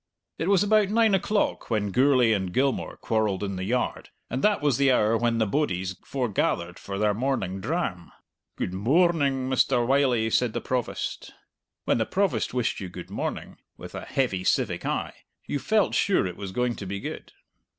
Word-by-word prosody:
It 165 - -1
was 200 -1 +4
about 210 -1 +3
nine 220 -1 +3
o'clock 205 +2 0
when 105 -3 0
Gourlay 130 -1 +4
and 95 -3 -1
Gilmour 135 +5 0
quarrelled 105 -4 0
in 100 -1 -3
the 95 - -4
yard, 125 +4 -2 0.2
and 130 +3 -2
that 210 -1 +3
was 145 -4 +1
the 140 -1 +4
hour 110 -2 +3
when 115 0 +1
the 110 - +2
bodies 95 -7 -1
forgathered 100 -8 -1
for 100 -1 -6
their 105 0 +2
morning 105 -5 -1
dram. 110 - -3 0.4
"Good 90 - -3
moarning, 140 - +2
Mr. 130 -2 +2
Wylie!" 125 -4 +2
said 120 -1 +2
the - - -2
Provost. 125 -2 -3 0.5
When - - +2
the 110 - 0
Provost 195 0 0
wished 125 -2 -1
you 95 -3 -6
good 90 0 -9
morning, - - -4 0.2
with - - -10
a - - -5
heavy 110 -9 -1
civic - - 0
eye, - - -2 0.3
you 145 - -2
felt 215 +6 +1
sure 200 - +2
it 90 -1 -4
was 95 -1 -6
going 125 +3 0
to 100 - -6
be 100 +1 -4
good. - - -7
120 Hz, 180 wpm, -26 LUFS, 100-140 Hz, 0.5 s, was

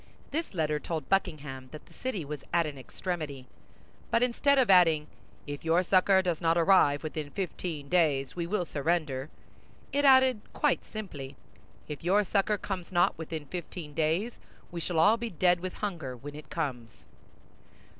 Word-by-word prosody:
This 315 - -3
letter 155 -2 0
told 155 -3 -4
Buckingham 145 -9 -1
that 155 - -10
the - - -20
city 225 - -4
was 150 0 -6
at 170 -1 +3
an 150 -2 -5
extremity; 145 -1 -5 0.6
but 230 - +3
instead 275 +3 +3
of 260 -3 +4
adding, 165 -5 +5 0.4
"If 145 -1 -6
your 165 +2 +3
succor 190 +1 +4
does 175 -3 -1
not 165 0 +3
arrive 165 -5 +4
within 155 -1 -4
fifteen 165 -4 -4
days, 145 -6 +2
we 170 -1 -2
will 190 -1 0
surrender," 150 -3 -1 0.6
it 285 - +2
added, 260 -4 +6
quite 295 -3 +1
simply, 145 -11 -7 0.5
"If 150 0 -7
your 195 +4 +3
succor 205 +1 +1
comes 190 -2 -5
not 175 -1 +3
within 160 -1 -6
fifteen 170 -1 -7
days, 165 +10 0 0.3
we 170 - -4
shall 170 0 -2
all 205 +8 +5
be 235 0 -4
dead 180 -1 +2
with 185 +1 -5
hunger 160 -11 -4
when 145 +4 -9
it 150 +1 -11
comes." 125 -9 -5
170 Hz, 165 wpm, -29 LUFS, 150-195 Hz, 0.6 s, added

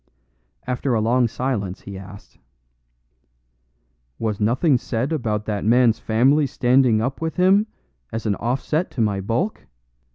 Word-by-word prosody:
After 125 0 -1
a - - +2
long 120 +3 +2
silence 110 -6 -3
he 100 - -9
asked: 95 +1 -12 1.8
"Was 110 -3 -2
nothing 125 +6 +2
said 125 +7 -2
about 110 -7 -2
that 105 -2 -3
man's 115 0 +3
family 135 +7 +2
standing 125 -3 +3
up 130 +5 -3
with 160 0 -2
him, 195 +4 +4 0.4
as 115 - -5
an 105 - +1
offset 135 +8 -1
to 120 - -4
my 100 -3 0
bulk? 120 - -2
120 Hz, 135 wpm, -22 LUFS, 110-135 Hz, 1.8 s, him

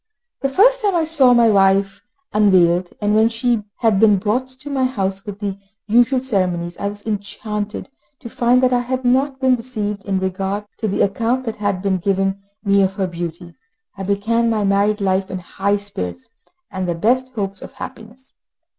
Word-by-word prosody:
The 275 - 0
first - - +4
time 405 -3 +1
I 335 - +2
saw 290 -6 +4
my 235 -1 +5
wife 195 0 +2 0.3
unveiled, 180 -4 +4
when 215 +2 +3
she 230 0 0 0.2
had 220 -4 +3
been 210 -2 +5
brought 220 +7 -1
to 260 +2 -11
my 270 -2 0
house 195 -6 -2
with 200 -1 -6
the 200 -2 -4 0.3
usual 240 +4 +3
ceremonies, 180 -8 -1
I 200 - -1
was 205 0 -7
enchanted 210 0 -4 0.3
to 250 - -9
find 245 +2 +2
that 255 0 +3
I 245 - +3
had 255 +1 -3
not 265 +2 +2
been 260 -1 +3
deceived 215 -5 -3
in 195 -1 0
regard 190 +2 -2
to 220 - -1
the 200 - -1
account 230 +6 0
that 225 - -4
had 200 -3 -2
been 190 -2 +1
given 195 +1 0 0.2
me 200 -1 +3
of 190 0 +1
her 195 -2 0
beauty. 170 0 -6 0.4
I 195 - -8
began 215 +4 +1
my 215 -2 0
married 200 +1 +2
life 190 0 0
in 185 - -4
high 195 +3 -1
spirits, 90 - -7 0.4
and 190 -2 -3
the 170 - 0
best 255 +8 +1
hopes 195 -3 -4
of - - -10
happiness. 240 +4 -11
205 Hz, 185 wpm, -19 LUFS, 195-245 Hz, 0.4 s, my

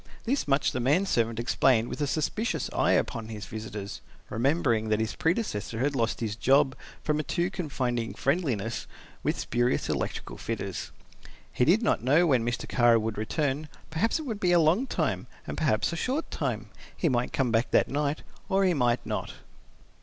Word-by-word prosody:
This 265 - 0
much 140 0 +2
the 125 - -2
man 145 +11 +3
servant 115 - 0
explained 120 0 +3
with - - -5
a 145 - +1
suspicious 165 - -1
eye - - +3
upon 115 -4 0
his 110 -2 -6
visitors, 105 -2 -6 0.3
remembering 120 -3 +1
that 110 0 +2
his 110 0 -1
predecessor 160 - -1
had 140 +4 0
lost 115 -2 0
his 110 -2 -2
job 135 +4 +4 0.3
from 150 0 +1
a - - 0
too 175 +4 -1
confiding 125 -10 -2
friendliness 130 - -1 0.3
with - - 0
spurious 120 +1 0
electric - - -3
fitters. - - -4 0.6
He 125 - +2
did 195 +9 +4
not 225 - +2
know 150 +8 +4
when 130 -8 +3
Mr. 120 0 -2
Kara 120 -1 +4
would 110 0 -2
return, 145 +6 -1 0.2
perhaps 170 - +1
it 315 - -5
would 225 -8 -4
be 180 -2 +3
a 175 - +6
long 170 +12 +3
time - - -1 0.2
and - - -4
perhaps 145 0 +1
a - - -2
short 265 - -2
time. 115 -7 -2 0.3
He - - +1
might 125 -4 +1
come 130 -4 0
back 115 +1 +2
that - - +4
night 145 +1 -1 0.3
or 195 +1 +3
he 185 - +3
might 120 -5 +1
not. - - -3
135 Hz, 185 wpm, -28 LUFS, 115-165 Hz, 0.6 s, a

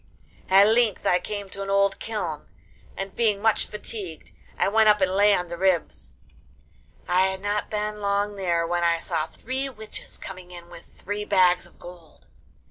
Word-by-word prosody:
At 195 +1 +7
length 225 -2 +2
I 180 - +3
came 205 +2 -5
to 195 - -6
an 195 - -4
old 200 0 +2
kiln, 180 -9 -4 0.5
and 195 0 -5
being 215 -4 +2
much 220 +1 +2
fatigued 205 -5 -8 0.3
I - - +2
went 215 +2 +4
up 210 0 +5
and 190 -1 +2
lay 205 +1 +5
on 180 - -2
the 170 0 -6
ribs. 185 - 0 0.9
I 185 +1 +3
had 190 0 -4
not 205 0 -1
been 210 0 -3
long 200 +1 0
there 170 -4 0
when 175 +1 -1
I 170 0 +3
saw 160 -1 -2
three 260 +9 -4
witches 220 -4 -9
coming 185 -2 -9
in 175 -1 -11
with - - -12
three 205 +1 -5
bags 180 -3 +3
of - - -23
gold. 175 -3 -14
195 Hz, 180 wpm, -25 LUFS, 180-210 Hz, 0.9 s, At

